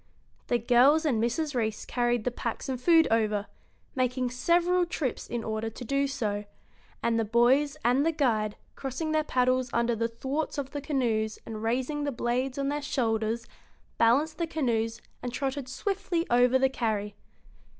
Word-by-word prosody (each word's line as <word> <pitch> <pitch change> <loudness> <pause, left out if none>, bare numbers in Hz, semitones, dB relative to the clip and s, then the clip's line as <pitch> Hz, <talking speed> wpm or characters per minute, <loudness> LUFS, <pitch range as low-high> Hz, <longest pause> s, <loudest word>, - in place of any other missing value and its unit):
The 240 - +2
girls 255 +7 +4
and 245 -8 +2
Mrs. 290 +6 -1
Reece 220 -3 -2
carried 240 -2 0
the 250 - 0
packs 235 -1 -4
and 255 -2 -3
food 330 +2 +5
over, 215 -2 +1 0.5
making 255 -1 0
several 345 +7 +2
trips 315 -7 -3
in 235 -1 -3
order 220 0 -2
to 235 +3 -9
do 275 +3 +1
so; 210 -7 -2 0.6
and 230 -1 +2
the - - +2
boys 255 +7 +3
and 250 +4 +4
the 330 - +2
guide, 225 -9 0 0.2
crossing 275 +4 -3
their 310 0 +2
paddles 255 -2 +1
under 235 0 +1
the 230 +1 0
thwarts 270 +8 -3
of 275 -1 -3
the 290 - -4
canoes 235 -7 0
and 220 -1 -6
raising 255 +6 -1
the 285 - -1
blades 250 +2 -1
on 275 0 0
their 295 +1 -2
shoulders, 230 -4 -1 0.5
balanced 285 +8 +3
the 335 - 0
canoes 235 -7 -1 0.2
and 245 -1 -4
trotted 270 0 -2
swiftly 355 +2 -2
over 245 +1 +5
the 265 0 +3
carry. 215 -5 -2
250 Hz, 170 wpm, -28 LUFS, 230-285 Hz, 0.6 s, food